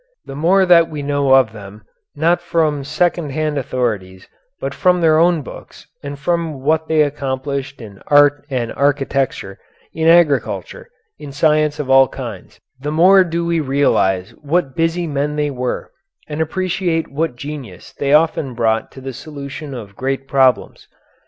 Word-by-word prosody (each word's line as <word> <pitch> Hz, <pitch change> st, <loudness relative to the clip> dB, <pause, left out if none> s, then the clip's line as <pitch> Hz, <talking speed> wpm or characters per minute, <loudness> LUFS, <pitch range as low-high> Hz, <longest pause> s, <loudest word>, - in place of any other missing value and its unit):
The 135 Hz, -, -8 dB
more 185 Hz, +6 st, +3 dB
that 170 Hz, -2 st, +5 dB
we 150 Hz, -2 st, -6 dB
know 140 Hz, -1 st, +2 dB
of 130 Hz, -5 st, +4 dB
them, 105 Hz, 0 st, -11 dB, 0.3 s
not 170 Hz, +4 st, +1 dB
from 160 Hz, -4 st, 0 dB
second 170 Hz, +1 st, -1 dB
hand 155 Hz, 0 st, -1 dB
authorities, 105 Hz, -8 st, -3 dB, 0.3 s
but -, -, -4 dB
from 180 Hz, -1 st, +2 dB
their 160 Hz, -2 st, +4 dB
own 170 Hz, -2 st, +3 dB
books -, -, -12 dB, 0.2 s
and 140 Hz, 0 st, -7 dB
from 160 Hz, -1 st, -2 dB
what 160 Hz, +2 st, +1 dB
they 155 Hz, -1 st, +3 dB
accomplished 140 Hz, -1 st, -4 dB
in 100 Hz, -3 st, -12 dB
art 145 Hz, 0 st, +4 dB
and 125 Hz, -4 st, -2 dB
architecture, 135 Hz, -7 st, -1 dB, 0.3 s
in 160 Hz, 0 st, -1 dB
agriculture, 140 Hz, -, +2 dB, 0.3 s
in 145 Hz, -2 st, -9 dB
science 150 Hz, +1 st, +1 dB
of 150 Hz, -, -4 dB
all 135 Hz, 0 st, +6 dB
kinds, 115 Hz, -8 st, -9 dB, 0.2 s
the 145 Hz, +3 st, -4 dB
more 185 Hz, +5 st, +6 dB
do 170 Hz, -1 st, -3 dB
we 170 Hz, -1 st, 0 dB
realize 130 Hz, -10 st, +1 dB
what 150 Hz, -2 st, -1 dB
busy 165 Hz, +1 st, 0 dB
men 150 Hz, -1 st, -2 dB
they 150 Hz, -1 st, -1 dB
were, 125 Hz, -2 st, -4 dB, 0.4 s
and 150 Hz, +1 st, -4 dB
appreciate 175 Hz, 0 st, -1 dB
what 150 Hz, -1 st, -2 dB
genius 135 Hz, -8 st, -9 dB
they 140 Hz, -1 st, -2 dB
often 150 Hz, -4 st, +2 dB
brought 110 Hz, -1 st, 0 dB
to 135 Hz, -, -11 dB
the 135 Hz, 0 st, -6 dB
solution 140 Hz, 0 st, -8 dB
of 105 Hz, -5 st, -9 dB
great 135 Hz, +1 st, -3 dB
problems. 130 Hz, -3 st, +1 dB
145 Hz, 160 wpm, -18 LUFS, 130-160 Hz, 0.4 s, all